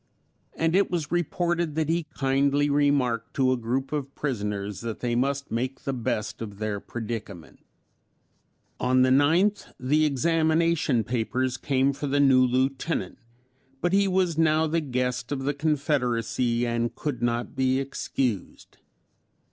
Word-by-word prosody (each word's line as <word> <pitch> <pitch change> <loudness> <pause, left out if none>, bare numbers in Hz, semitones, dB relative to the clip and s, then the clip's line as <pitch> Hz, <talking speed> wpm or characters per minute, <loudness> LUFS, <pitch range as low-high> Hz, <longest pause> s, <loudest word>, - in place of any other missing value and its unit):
And 165 +1 +1
it 200 +1 +3
was 170 -4 -2
reported 175 -1 0
that 160 -1 0
he 165 0 0
kindly 140 +1 +2
remarked 135 -5 +1
to 130 -1 +3
a - - +3
group 125 +3 -2
of 140 -2 -4
prisoners 105 - -3
that 115 -2 -5
they 120 -1 -1
must 140 +3 -1
make 130 +4 -2
the 135 - -2
best 110 -4 -3
of 105 -3 -6
their 105 -1 -2
predicament. 110 -7 -7 1.2
On 130 0 +3
the 130 - +3
9th 165 +10 +3
the 150 +5 +2
examination 160 -2 +2
papers 125 +3 -1
came 135 0 +1
for 145 +1 -4
the 140 +1 +1
new 135 -2 +5
Lieutenant, 130 +4 -1 0.6
but 175 +4 0
he 200 0 +4
was 180 -4 +1
now 160 0 +3
the 165 +1 0
guest 125 -2 -2
of 135 -2 -2
the 145 +2 0
Confederacy 125 -5 0
and 120 0 -1
could 140 -6 -4
not 120 0 -1
be 130 0 +2
excused. 130 -5 -3
135 Hz, 145 wpm, -26 LUFS, 120-155 Hz, 1.2 s, new